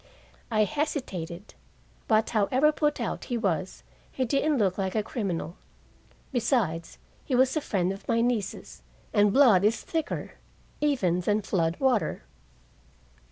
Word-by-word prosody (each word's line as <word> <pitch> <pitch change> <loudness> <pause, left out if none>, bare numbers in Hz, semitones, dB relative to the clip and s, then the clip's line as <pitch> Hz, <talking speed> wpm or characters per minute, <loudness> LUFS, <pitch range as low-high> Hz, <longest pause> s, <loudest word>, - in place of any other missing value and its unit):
I 215 -2 +3
hesitated, 210 - -3 0.5
but 220 0 +2
however 255 +7 +3
put 295 -1 0
out - - -3
he 245 - -2
was, 190 -3 -2 0.3
he 260 - -1
didn't 285 +3 +1
look 195 -5 +2
like 190 +1 -2
a 215 - +1
criminal. 185 -7 -4 0.7
Besides, 225 - 0 0.3
he 260 - -1
was 260 +2 +3
a 310 - +1
friend 190 -8 0
of 195 - -12
my 230 -1 +2
niece's, 230 -4 -2 0.3
and 205 -1 +4
blood 230 -7 +6
is 215 +3 +2
thicker 320 -3 -3 0.5
even 225 - +1
than 210 +3 0
flood 170 -3 0
water. 255 - +1
220 Hz, 135 wpm, -27 LUFS, 190-265 Hz, 0.7 s, blood